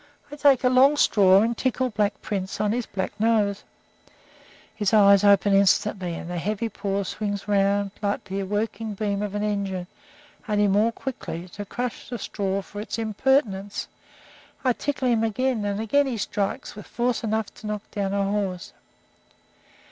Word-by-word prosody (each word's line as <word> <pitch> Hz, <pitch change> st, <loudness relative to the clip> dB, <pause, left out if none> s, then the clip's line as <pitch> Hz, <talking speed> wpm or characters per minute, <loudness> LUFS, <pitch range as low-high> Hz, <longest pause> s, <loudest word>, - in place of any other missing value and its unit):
I -, -, -6 dB
take 280 Hz, -3 st, +4 dB
a 250 Hz, -, +4 dB
long 270 Hz, +4 st, +5 dB
straw, 195 Hz, -5 st, +5 dB
and 235 Hz, +1 st, 0 dB
tickle 260 Hz, +1 st, -1 dB
Black 205 Hz, -1 st, -1 dB
Prince 195 Hz, -1 st, -3 dB
on 210 Hz, -1 st, +1 dB
his 240 Hz, +1 st, -2 dB
black 190 Hz, -1 st, -3 dB
nose. 210 Hz, -2 st, +1 dB, 1.1 s
His 210 Hz, -1 st, +1 dB
eyes 200 Hz, -1 st, +6 dB
open 200 Hz, 0 st, +5 dB
instantly, 195 Hz, -2 st, +2 dB
and 165 Hz, -, -7 dB
the 175 Hz, 0 st, -3 dB
heavy 215 Hz, +5 st, -2 dB
paw 200 Hz, -1 st, -2 dB
swings 205 Hz, +1 st, -4 dB
round 200 Hz, 0 st, +2 dB
like 205 Hz, -1 st, -1 dB
the 195 Hz, 0 st, -4 dB
working 210 Hz, +2 st, -3 dB
beam 200 Hz, -1 st, -1 dB
of 205 Hz, -1 st, -3 dB
an 205 Hz, -, -1 dB
engine, 200 Hz, -3 st, -2 dB, 0.6 s
only 210 Hz, -1 st, +3 dB
more 210 Hz, +4 st, +3 dB
quickly, 185 Hz, -9 st, -6 dB
to 205 Hz, +3 st, -7 dB
crush 245 Hz, +4 st, -5 dB
the 245 Hz, -, -4 dB
straw 195 Hz, -2 st, -2 dB
for 205 Hz, +1 st, -8 dB
its 215 Hz, -, -5 dB
impertinence. 215 Hz, -3 st, 0 dB, 0.8 s
I 255 Hz, -2 st, +3 dB
tickle 275 Hz, 0 st, -2 dB
him 230 Hz, -2 st, +2 dB
again, 225 Hz, 0 st, 0 dB
and 200 Hz, 0 st, -1 dB
again 275 Hz, +6 st, +2 dB
he 245 Hz, -3 st, -2 dB
strikes, 200 Hz, -1 st, -3 dB
with 210 Hz, -, -10 dB
force 240 Hz, 0 st, -1 dB
enough 220 Hz, -1 st, -1 dB
to 215 Hz, -, -10 dB
knock 210 Hz, -1 st, -3 dB
down 200 Hz, -2 st, -2 dB
a 200 Hz, -, +1 dB
horse. 195 Hz, -3 st, -2 dB
205 Hz, 170 wpm, -24 LUFS, 200-225 Hz, 1.1 s, eyes